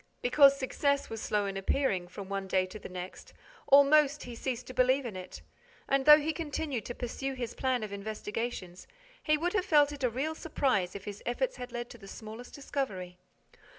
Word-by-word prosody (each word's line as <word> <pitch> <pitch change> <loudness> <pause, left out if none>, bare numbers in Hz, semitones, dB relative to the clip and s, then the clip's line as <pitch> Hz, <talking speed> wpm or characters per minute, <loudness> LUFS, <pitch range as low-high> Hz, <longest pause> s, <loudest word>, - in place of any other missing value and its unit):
Because 275 +2 +6
success 280 0 0
was 225 -1 -5
slow 210 -1 0
in 195 -1 -3
appearing, 195 -2 0
from 195 +2 -8
one 195 0 -3
day 185 0 +2
to 200 +3 -9
the - - -9
next, 180 0 -8 0.3
almost, 285 +1 +6
he 245 - -8
ceased 240 +1 -4
to 255 - -9
believe 255 +2 +3
in 225 -5 -5
it; 185 -1 -8 0.4
and, 275 -1 +2
though 300 0 +11
he 310 +1 -1
continued 295 -6 -3
to 240 - -5
pursue 265 +2 -4
his 245 -3 -4
plan 255 -3 0
of 210 -1 -5
investigations, 210 -2 -5 0.3
he 305 -1 +2
would 350 +3 -1
have 390 -4 +2
felt 295 -4 +4
a 250 - +3
real 270 +7 -2
surprise 255 - 0
if 200 - -7
his 205 -1 -7
efforts - - -1
had 250 0 -7
led 240 0 -4
to 240 - -12
the 195 - -12
smallest 220 +4 -9
discovery. 195 -11 -4
245 Hz, 195 wpm, -30 LUFS, 200-280 Hz, 0.4 s, though